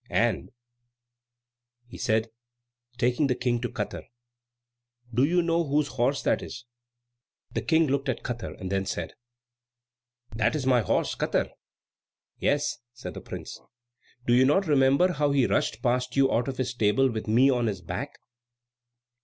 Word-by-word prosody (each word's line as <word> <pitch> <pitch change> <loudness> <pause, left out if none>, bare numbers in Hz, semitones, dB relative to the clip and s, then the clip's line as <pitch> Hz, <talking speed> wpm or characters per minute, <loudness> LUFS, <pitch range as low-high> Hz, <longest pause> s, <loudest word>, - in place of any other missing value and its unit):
And," - - +1 1.4
he 120 - -12
said, 110 +1 +1 0.7
taking 125 +4 +2
the 125 - +1
King 120 -1 0
to 120 - -2
Katar, - - -4 1.1
"do 125 +3 +3
you 175 +4 +3
know 170 0 +1
whose 145 -1 +1
horse 130 +3 0
that - - +1
is?" 120 0 -8 0.9
The - - -2
King 165 0 +3
looked 140 -1 -1
at 130 - -2
Katar, 120 -2 -5
and 95 0 -5
then 95 0 0
said, 85 -3 -4 1.2
"That 110 +3 +1
is 145 -4 -2
my 125 -2 +4
horse - - 0
Katar." - - -1 0.9
"Yes," - - 0
said 125 - -8
the - - -8
prince. - - -8 0.6
"Do 120 - +3
you 125 +1 +6
not 150 +9 +3
remember 140 +4 +4
how 145 -2 +1
he 135 -3 +3
rushed 115 0 0
past 125 0 0
you 135 -1 +3
out 120 - +1
of 135 -2 -4
his 130 -1 -1
stable 125 +3 +2
with 110 -1 -5
me 125 +5 +5
on 120 -2 +1
his 95 -4 -3
back?" - - -5
125 Hz, 155 wpm, -27 LUFS, 120-140 Hz, 1.4 s, you